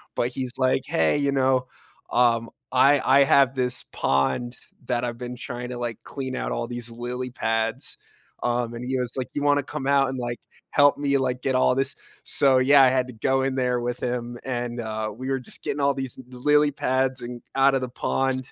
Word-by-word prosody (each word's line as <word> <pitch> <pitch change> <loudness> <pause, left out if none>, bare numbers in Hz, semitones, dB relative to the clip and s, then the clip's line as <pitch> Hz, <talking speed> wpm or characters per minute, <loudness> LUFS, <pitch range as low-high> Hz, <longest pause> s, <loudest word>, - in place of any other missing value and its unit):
but 120 - 0
he's 130 0 -5
like, 130 0 +2
"Hey, 80 - +2
you 140 -1 +1
know? 130 -2 +2 0.4
Um, 115 -1 +2 0.2
I 135 +3 +5 0.2
I - - +7
have 135 -1 +4
this 125 -1 0
pond 70 - 0 0.3
that 120 -1 0
I've 120 -1 -3
been 125 0 -6
trying 125 0 -6
to, 125 - -5
like, 120 -2 -3
clean 130 -2 -5
out - - -3
all 120 - -2
these 120 -1 -6
lily 125 +2 -5
pads." 115 -1 -1 0.5
Um, 120 -1 0
and 120 +1 -6
he 130 +1 -1
was 125 -1 -2
like, 130 - -2
"You 145 - -2
wanna 145 0 +3
come 145 0 -6
out 140 -1 +3
and, 130 - -4
like, 120 -1 -4 0.3
help 145 0 +5
me, 140 -1 +1
like, 125 -1 -1
get 135 - 0
all 130 0 +3
this" 135 +1 -1 0.3
so, 135 -2 +5
yeah, 135 +2 +6
I 130 - +6
had 130 -1 +1
to 125 - -9
go 130 +4 +1
in 135 0 0
there 125 -1 +1
with 120 +1 -3
him, 120 -1 -3
and, 120 -2 -3
uh, 110 -1 -3
we 130 +3 -6
were 135 0 0
just 125 - -9
getting 145 - -3
all 140 0 +3
these 135 -2 -5 0.2
l 125 - -10
lily 150 +1 +4
pads 130 -1 0
and 120 0 -6 0.2
out 135 0 +4
of 135 - 0
the 130 - -3
pond, 130 +1 -2
125 Hz, 215 wpm, -24 LUFS, 120-135 Hz, 0.5 s, I